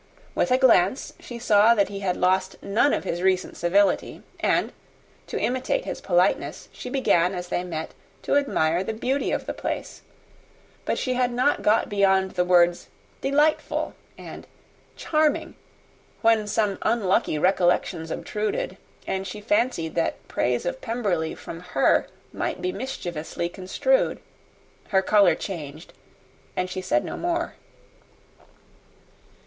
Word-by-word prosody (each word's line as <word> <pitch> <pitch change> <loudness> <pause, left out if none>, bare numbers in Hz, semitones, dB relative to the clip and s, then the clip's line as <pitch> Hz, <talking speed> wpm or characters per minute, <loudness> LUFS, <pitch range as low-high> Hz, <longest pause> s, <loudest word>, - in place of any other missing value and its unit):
With - - +1
a 255 - +4
glance 240 -4 +3
she 240 - -8
saw 225 -1 +5
that 200 -2 +2
he 200 -1 -6
had 185 -2 -1
lost 185 +1 +1
none 220 +8 +2
of - - 0
his 170 +1 -3
recent 185 0 +1
civility; 190 +3 +1 0.2
and, - - +1 0.5
to - - -3
imitate 260 - -1
his - - -5
politeness, - - +1
she 250 - -8
began 185 -9 +2
as 180 0 -6
they 175 - -1
met 160 -3 -5 0.3
to - - +1
admire 175 - +2
the 220 +3 -4
beauty 260 +5 -1
of - - -2
the - - -3
place; - - -5 0.8
but - - 0
she 255 - -1
had 250 0 +1
not 255 +4 +1
got 215 +2 +3
beyond 190 -2 +2
the 180 - +1
words 175 -1 +3 0.3
"delightful," 295 +3 +1 0.2
and - - -10 0.5
"charming," 315 +1 0 0.7
when 225 -2 +4
some 210 -2 0
unlucky 200 -8 +1
recollections 175 -1 +1
obtruded, 215 - -3 0.3
and 190 0 -3
she 200 +3 -6
fancied 225 - 0
that 165 - -2
praise 120 +3 0
of 260 +9 -3
Pemberley 200 -9 -1
from 165 - -8
her 180 0 +2 0.3
might - - -3
be 365 - -1
mischievously 175 - -4
construed. 355 - 0 0.7
Her 190 -2 +2
colour 200 -5 +5
changed, 160 -4 -7 0.6
and 185 0 -2
she 185 - -3
said 120 -9 +1
no - - -5
more. 345 0 -1
195 Hz, 140 wpm, -25 LUFS, 180-250 Hz, 0.8 s, saw